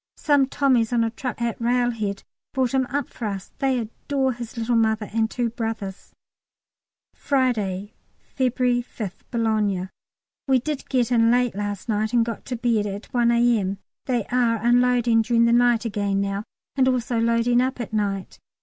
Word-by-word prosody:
Some 285 -3 +3
Tommies 255 -5 +2
on 235 -1 +2
a 225 - -1
truck 245 0 -5
at 235 0 -2
Railhead 230 -4 0 0.3
brought 260 -2 +1
him 260 -1 +2
up 280 0 -2
for 235 - -7
us; 200 -2 -5
they 265 -2 +1
adore 260 +4 -2
his 235 0 -8
little 230 +1 0
mother 220 -2 +1
and 220 -1 +1
two 240 -1 -2
brothers. 225 -4 -5 1.0
Friday, 215 -8 -1 0.4
February 250 -1 +1
5th, 215 -5 -7
Boulogne. 210 -5 0 0.6
We 265 -1 +4
did 285 +3 -4
get 250 -2 +1
in 230 -1 +4
late 245 0 +2
last 205 0 -4
night, 215 0 -1
and 235 -1 +4
got 230 -2 -6
to 255 - -3
bed 230 -3 +1
at 200 +1 -7
1 240 -1 +3
A.M. 235 -5 +2 0.3
They 245 -5 0
are 240 -2 +3
unloading 240 0 +3
during 235 +1 +3
the 235 - +3
night 240 -1 +3
again 200 -2 -1
now, 200 +1 -2 0.3
and 260 -2 +3
also 245 -2 0
loading 230 +1 +3
up 255 0 -1
at 240 - -5
night. 200 -3 -2
235 Hz, 170 wpm, -23 LUFS, 215-245 Hz, 1.0 s, We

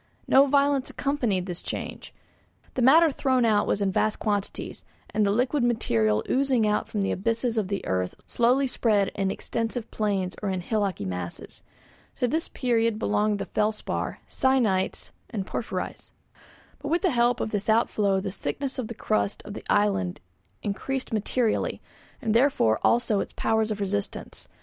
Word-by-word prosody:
No 275 +1 +6
violence 280 -1 +2
accompanied 240 -10 -1
this 180 -2 -5
change; - - -6 0.6
the 255 - -1
matter 310 +6 +6
thrown 260 -3 +2
out 210 -2 +3
was 200 - +1
in 195 - +1
vast 215 +3 +1
quantities, 205 -2 -3 0.3
and 215 - +2
the 200 - +3
liquid 250 +6 +1
material 110 - +2
oozing 260 -4 +2
out 210 0 +1
from 205 -2 -2
the - - 0
abysses 230 +4 0
of 215 -4 0
the 200 0 -3
earth 90 -1 -1
slowly 250 +4 +2
spread 215 -6 +2
in 195 -1 -1
extensive 230 +3 -3
plains 195 -4 -1
or 205 - -1
in 185 -1 -2
hillocky 200 - -1
masses. 90 -2 -6 0.6
To 250 - +2
this 320 +6 -1
period 230 -3 +1
belong 210 -1 +1
the 195 - -4
felspar, 215 0 -2
syenites, 235 -8 +1 0.2
and 205 -5 -3
porphyries. 235 - -4 0.7
But 285 - -6
with 340 +5 +1
the 370 - +3
help 240 0 +2
of - - -2
this 205 0 -2
outflow 210 -3 +2
the 195 0 -4
thickness 265 +6 -4
of 240 - -2
the 235 - -7
crust 100 - -1
of - - -7
the - - -8
island 95 -3 +1 0.4
increased 255 +6 -3
materially, 220 +2 0 0.4
and 220 -2 +1
therefore 230 - +3
also 235 -3 +3
its - - -4
powers 220 0 +1
of 210 -1 -3
resistance. 200 0 -4
215 Hz, 165 wpm, -26 LUFS, 195-250 Hz, 0.7 s, No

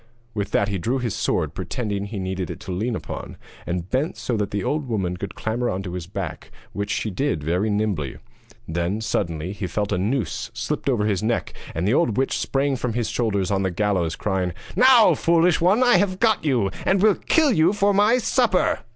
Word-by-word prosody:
With 105 -2 -2
that 100 - +2
he 100 -2 -2
drew 120 +10 0
his 120 -5 -2
sword, - - -1
pretending 100 -4 -3
that - - -8
he 110 - -5
needed 95 -2 -3
it - - -6
to 95 - -6
lean 110 +6 -1
upon, - - -7 0.3
and 90 0 -2
bent 135 - -1
so 120 - -2
that 105 -2 -1
the 100 -2 -2
old 150 -2 -1
woman 95 -6 -1
could 100 +2 -6
clamber 120 +2 -1
on 95 +1 -3
to 90 -2 -6
his 90 -2 -5
back, 95 -3 -6 0.2
which 100 0 -3
she 110 -1 -1
did 95 - -1
very 90 +7 0
nimbly. 100 -9 -1 0.5
Then, 85 +5 -1
suddenly, 85 -5 -2
he 100 -2 -4
felt 105 +3 -2
a 90 - +1
noose 115 +3 -1
slipped 130 +5 -2
over 115 -6 +1
his 105 -3 0
neck, 115 +2 -1 0.2
and 85 +4 -1
the 110 - +3
old 125 -8 +2
witch 135 - +1
sprang 135 0 0
from 125 -2 -2
his 120 -1 -1
shoulders 100 -5 0
on 100 - +2
to - - 0
the 90 - -9
gallows, 95 -5 0
crying: 95 -3 -1 0.2
'Now, 250 -3 +7
foolish 170 +1 +3
one, 195 +8 +4
I 245 -7 +6
have 185 0 0
got 220 -3 +3
you, 120 -10 +1
and 190 - +2
will 210 +1 +5
kill 315 +5 +2
you 170 -3 +4
for 205 0 +2
my 210 +5 +4
supper.' 240 -5 +2
110 Hz, 220 wpm, -23 LUFS, 95-145 Hz, 0.5 s, Now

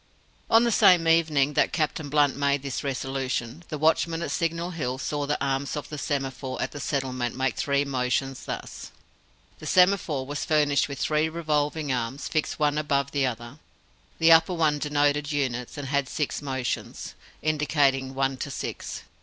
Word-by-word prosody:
On 225 +1 +6
the 235 - +2
same 180 -6 +5
evening 155 -4 +3
that - - +2
Captain 155 -2 -1
Blunt 145 -1 +3
made 140 -1 +1
this 140 -2 -4
resolution, 135 +1 -3
the 155 - -3
watchman 165 +2 +1
at 140 - -3
Signal 165 +4 -1
Hill 130 -7 -3
saw 145 +1 -3
the 150 - 0
arms 135 +1 -1
of 145 -2 -5
the 150 -1 -6
semaphore 135 -2 -3
at - - -2
the 145 - -7
settlement 130 -4 -2
make 130 -1 0
three 140 0 +1
motions, 135 0 -1
thus: - - -6 0.7
The - - -8
semaphore 180 -7 +3
was 145 +1 -4
furnished 145 -3 +2
with 140 - -5
three 155 +1 +1
revolving 150 -2 -1
arms, 125 +3 -3
fixed 155 - -1
one 150 0 +1
above 140 -2 0
the 140 -2 +1
other. 120 +3 -6 0.6
The 165 0 +5
upper 165 +2 +6
one 155 -3 +2
denoted 145 0 +1
units, 130 -4 -2
and 145 -2 -5
had 140 -2 0
six 150 -2 -2
motions, 130 -3 -4 0.3
indicating 145 -3 +1
ONE 135 0 0
to - - -4
SIX. - - -5
145 Hz, 170 wpm, -26 LUFS, 135-155 Hz, 0.7 s, On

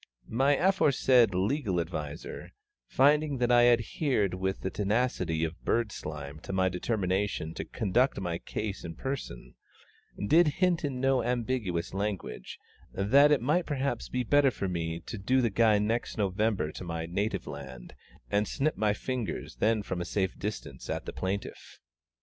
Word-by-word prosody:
My 135 +5 +3
aforesaid 135 - +4
legal 100 - 0
adviser, 75 -1 -5 0.3
finding 145 +1 +3
that 125 0 +1
I 120 0 +6
adhered 120 - +1
with 95 +1 -2
the 95 - -3
tenacity 105 -6 0
of 80 0 -4
bird 115 -3 +1
slime 75 -3 -7
to 85 - -7
my 95 -1 +2
determination 95 -3 -1
to - - -5
conduct 120 +6 +1
my 85 -3 -3
case 105 -2 -5
in 85 -1 -6
person, 130 - -5 0.7
did 165 +5 +6
hint 180 -3 +2
in 135 -3 -2
no 135 0 +2
ambiguous 115 -8 -1
language, 100 -11 -4 0.3
that 135 +10 +5
it 145 - +4
might 165 +6 +1
perhaps 140 -4 -2
be 125 - -1
even 120 - -6
better 145 -1 +6
for 100 -6 -3
me 85 -2 -2
to 110 +5 -7
do 130 +7 +2
the 120 -3 +1
guy 110 0 +4
next 110 +3 -1
November 100 -4 0
to - - -8
my 85 -1 -4
native 95 +2 -2
land, 70 -4 -9 0.4
and 105 +1 +2
snip 150 +3 0
my 105 -1 +1
fingers 125 -1 -4
then 110 -1 +2
from 90 -3 -3
a - - 0
safe 95 -1 -1
distance 85 -11 -6
at - - -3
the - - -6
plaintiff. 95 +2 -5
105 Hz, 160 wpm, -29 LUFS, 90-130 Hz, 0.7 s, I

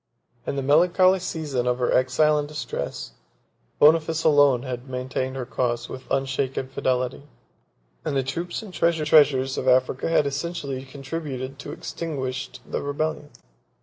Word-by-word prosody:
In - - -1
the 135 - -2
melancholy 180 +6 +4
season 150 -8 -2
of 125 0 +1
her 125 -1 +1
exile 150 +4 +3
and 145 - -3
distress, 150 0 -5 0.7
Boniface 160 +1 +4
alone 145 -5 +5
had 130 0 -6
maintained 130 +1 -3
her 130 -2 -4
cause 120 0 -1
with 130 0 -9
unshaken 135 -1 -1
fidelity: 130 0 -1 0.8
and 140 - -1
the 135 - +1
troops 170 - -4
and 200 -4 -10
treasures 150 -6 +3
of 130 - -4
Africa 130 +3 +2
had 165 -3 +3
essentially 140 -2 -3
contributed 135 -1 -6
to 145 - -7
extinguish 135 -5 -4 0.2
the - - -3
rebellion. 150 +1 -2
140 Hz, 140 wpm, -24 LUFS, 130-155 Hz, 0.8 s, alone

